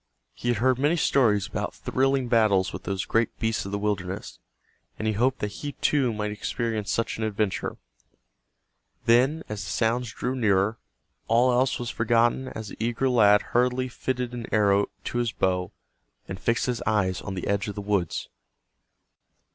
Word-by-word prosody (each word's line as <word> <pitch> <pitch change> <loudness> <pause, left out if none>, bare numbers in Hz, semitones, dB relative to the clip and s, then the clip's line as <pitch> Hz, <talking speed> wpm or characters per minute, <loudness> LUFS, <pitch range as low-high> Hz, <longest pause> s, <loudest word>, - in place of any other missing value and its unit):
He 120 - -7
had 120 -2 +2
heard 130 +3 +2
many 145 +5 +3
stories 110 - +3
about - - -4
thrilling 130 - 0
battles 105 -5 +3
with 85 - -7
those 95 0 -2
great 115 -1 0
beasts 110 -3 -1
of - - -6
the 100 - -1
wilderness, 100 -3 -3 0.6
and 110 - -2
he 110 - +2
hoped 125 +5 +1
that 105 - -2
he, 145 -1 -4
too, 135 -5 +1
might 105 -1 -3
experience 110 0 -2
such 115 -1 -1
an - - -1
adventure. 105 -2 -1 1.3
Then, 130 +7 +3
as 105 -1 -5
the - - -6
sounds 120 +1 0
drew 125 +3 -3
nearer, 110 -2 +2 0.5
all 120 +3 +4
else 125 +2 +2
was 120 -1 -4
forgotten 120 +3 +2
as 110 -4 -7
the - - -10
eager 120 +3 0
lad 105 -4 +5
hurriedly 125 +1 +2
fitted 125 -1 -3
an 120 -2 -5
arrow 100 -1 +3 0.2
to 120 - -2
his 120 -2 0
bow, 90 -1 0 0.6
and 95 - -6
fixed 115 +3 +1
his 125 -2 -2
eyes 95 -4 +1
on 95 - -5
the 90 - -4
edge 100 0 0
of 105 - -5
the - - -5
woods. 100 -4 -1
115 Hz, 175 wpm, -26 LUFS, 100-125 Hz, 1.3 s, lad